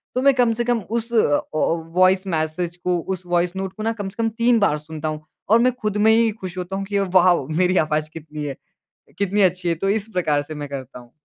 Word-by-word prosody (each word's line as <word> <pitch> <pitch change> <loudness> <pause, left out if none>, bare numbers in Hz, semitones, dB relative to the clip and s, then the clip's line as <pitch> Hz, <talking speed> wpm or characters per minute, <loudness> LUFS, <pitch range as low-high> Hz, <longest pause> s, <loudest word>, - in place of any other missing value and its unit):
तो 255 - +1
मैं 275 +1 +5
कम 245 -3 +2
से 240 +2 -1
कम 240 -1 +1
उस 230 +4 -4
अ - - +3 0.2
अ, - - -2 0.2
वॉइस 180 +4 +2
मैसेज 165 +1 -2
को 180 0 0
उस 185 +1 -4
वॉइस 175 +1 0
नोट 190 0 -4
को 215 - -7
ना 225 - +1
कम 205 -3 -5
से 230 +4 -4
कम 225 - +2
3 235 +1 +2
बार 200 -8 +2
सुनता 155 +1 -6
हूँ 155 0 -4 0.3
और 225 - +6
मैं 250 +2 +4
खुद 210 -1 -1
में 220 +1 +5
ही 230 0 +4
खुश 185 -4 -8
होता 180 +1 -4
हूँ 195 0 -3
कि 200 0 -1
वाओ 180 -6 +3
मेरी 180 +4 +1
आवाज़ 155 0 -1
कितनी 150 -2 -7
अ, 135 - -5 0.6
कितनी 200 +1 +1
अच्छी 180 -1 +1
है 170 - +2
तो 195 +5 -2
इस 210 +1 0
प्रकार 150 -5 +1
से 155 +2 -8
मैं 145 -1 -6
करता 135 -2 -7
हूँ। 120 -1 -15
185 Hz, 250 wpm, -22 LUFS, 160-215 Hz, 0.6 s, और